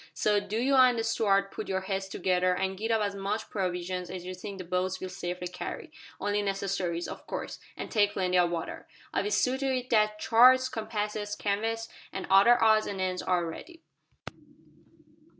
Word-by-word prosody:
So 210 Hz, -1 st, +2 dB
do 205 Hz, +2 st, -4 dB
you 260 Hz, +4 st, +1 dB
and 255 Hz, -2 st, +6 dB
the 225 Hz, -, 0 dB
stooard 200 Hz, -3 st, +1 dB
putt -, -, -6 dB
your 190 Hz, 0 st, -1 dB
heads 190 Hz, 0 st, -3 dB
together 185 Hz, -1 st, +1 dB
an' 190 Hz, +1 st, -1 dB
git 220 Hz, +4 st, -4 dB
up 225 Hz, -2 st, +2 dB
as 200 Hz, -1 st, -1 dB
much 200 Hz, +2 st, -3 dB
provisions 180 Hz, -2 st, -3 dB
as 180 Hz, -1 st, -7 dB
you 185 Hz, -, -5 dB
think 195 Hz, +2 st, -7 dB
the 185 Hz, -, -6 dB
boats 185 Hz, +1 st, -1 dB
will 185 Hz, -, -5 dB
safely 180 Hz, 0 st, -4 dB
carry. 180 Hz, -, -7 dB, 0.3 s
Only 205 Hz, +1 st, 0 dB
necessaries, 195 Hz, -3 st, -2 dB
of -, -, -9 dB
course, -, -, -5 dB, 0.2 s
an' -, -, -5 dB
take 205 Hz, -3 st, +2 dB
plenty 185 Hz, -2 st, 0 dB
o' 175 Hz, -, +4 dB
water. 170 Hz, -1 st, -5 dB, 0.3 s
I'll 205 Hz, -, 0 dB
see 250 Hz, +6 st, +1 dB
to 270 Hz, -1 st, 0 dB
it 255 Hz, 0 st, -4 dB
that 215 Hz, -1 st, +3 dB
charts, 255 Hz, +4 st, +5 dB
compasses, 210 Hz, -1 st, -3 dB
canvas, 225 Hz, +3 st, -1 dB, 0.2 s
and 190 Hz, -, -5 dB
other 200 Hz, +5 st, +7 dB
odds 220 Hz, -1 st, +4 dB
and 200 Hz, -2 st, -4 dB
ends 185 Hz, -1 st, -1 dB
are 175 Hz, -2 st, +1 dB
ready." 330 Hz, -, -9 dB
200 Hz, 185 wpm, -29 LUFS, 185-220 Hz, 0.3 s, other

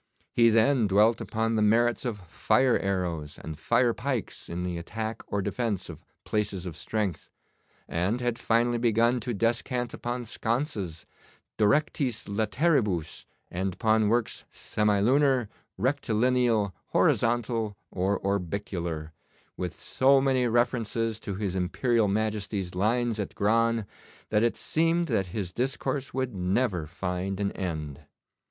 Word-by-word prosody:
He 115 Hz, -1 st, +5 dB
then 115 Hz, +1 st, +4 dB
dwelt 105 Hz, +4 st, +4 dB
upon 115 Hz, 0 st, -1 dB
the 110 Hz, -, +2 dB
merits 115 Hz, +4 st, +3 dB
of 115 Hz, -4 st, -2 dB
fire 125 Hz, +8 st, +2 dB
arrows 85 Hz, -6 st, -2 dB
and 80 Hz, -1 st, -8 dB
fire 115 Hz, +8 st, +3 dB
pikes 125 Hz, -3 st, -4 dB
in 85 Hz, +1 st, -3 dB
the 90 Hz, -1 st, -3 dB
attack 110 Hz, +6 st, -4 dB
or 100 Hz, -1 st, -1 dB
defence 105 Hz, -5 st, -2 dB
of 80 Hz, -4 st, -9 dB, 0.2 s
places 100 Hz, -4 st, -1 dB
of 85 Hz, -4 st, -5 dB
strength, 105 Hz, -1 st, -3 dB, 0.6 s
and 95 Hz, +8 st, 0 dB
had 120 Hz, -1 st, -1 dB
finally 120 Hz, +1 st, +2 dB
begun 115 Hz, +1 st, +3 dB
to 120 Hz, +2 st, -4 dB
descant 120 Hz, +3 st, 0 dB
upon 120 Hz, 0 st, -4 dB
sconces, 110 Hz, -, -2 dB, 0.5 s
'directis 125 Hz, +1 st, +1 dB
lateribus,' 105 Hz, -, 0 dB, 0.2 s
and 95 Hz, +1 st, -2 dB
upon 110 Hz, +1 st, +3 dB
works, 115 Hz, +1 st, 0 dB
semilunar, 120 Hz, +4 st, +2 dB, 0.3 s
rectilineal, 120 Hz, -5 st, +1 dB, 0.2 s
horizontal, 115 Hz, -3 st, +1 dB
or 95 Hz, +2 st, 0 dB
orbicular, 90 Hz, -5 st, -3 dB, 0.4 s
with 90 Hz, -2 st, -4 dB
so 135 Hz, +1 st, +3 dB
many 130 Hz, -2 st, +2 dB
references 115 Hz, -2 st, 0 dB
to 100 Hz, -3 st, -5 dB
his 95 Hz, -2 st, -2 dB
Imperial 110 Hz, +5 st, +1 dB
Majesty's 100 Hz, -2 st, -1 dB
lines 115 Hz, +4 st, +1 dB
at 100 Hz, -, -4 dB
Gran, 115 Hz, +1 st, +2 dB, 0.4 s
that 105 Hz, -1 st, +2 dB
it 120 Hz, 0 st, +1 dB
seemed 165 Hz, +2 st, +1 dB
that 100 Hz, -6 st, +1 dB
his 90 Hz, -1 st, -4 dB
discourse 135 Hz, +3 st, -2 dB
would 130 Hz, -2 st, -2 dB
never 95 Hz, -2 st, 0 dB
find 90 Hz, +3 st, -3 dB
an 100 Hz, -1 st, 0 dB
end. 80 Hz, -6 st, -4 dB
110 Hz, 130 wpm, -28 LUFS, 95-120 Hz, 0.6 s, He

